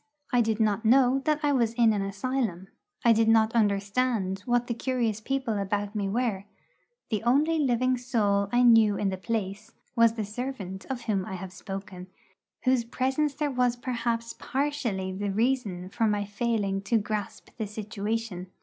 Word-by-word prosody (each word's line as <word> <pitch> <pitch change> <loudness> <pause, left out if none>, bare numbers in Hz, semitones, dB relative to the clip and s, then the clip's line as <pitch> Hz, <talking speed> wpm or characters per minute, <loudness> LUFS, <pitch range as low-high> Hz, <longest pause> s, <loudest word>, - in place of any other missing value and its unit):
I 245 - +5
did 220 -1 0
not 215 0 +1
know 255 +3 +5
that 305 -1 +2
I 290 - +3
was 235 -5 +2
in 230 -2 +4
an 205 - -1
asylum; 195 -2 -2 0.4
I 235 - +7
did 225 0 +2
not 225 0 +4
understand 205 -1 +1
what 245 0 +2
the 240 - -2
curious 235 -3 -1
people 260 -4 -1
about 205 +1 -2
me 205 -2 -1
were; 215 -3 -1 0.7
the 215 - 0
only 295 +7 +2
living 255 -2 +2
soul 205 -5 +1
I 245 +1 +4
knew 225 -4 +6
in 200 - 0
the 190 - -3
place 210 +1 -4 0.2
was 230 -1 +5
the 220 -2 -3
servant 210 -4 -5
of 260 -2 -3
whom 205 -5 -1
I 190 - -6
have 185 0 -7
spoken, 190 -1 -7 0.6
whose 255 -2 +3
presence 265 +5 -1
there 295 0 -1
was 250 -1 +1
perhaps 235 -1 -2
partially 260 -9 -2
the 200 +2 -3
reason 210 -4 0
for 225 +3 0
my 205 -1 0
failing 205 -2 -1
to 230 +3 +2
grasp 210 -1 -4
the 220 - -2
situation. 210 -2 -4
225 Hz, 170 wpm, -27 LUFS, 200-245 Hz, 0.7 s, I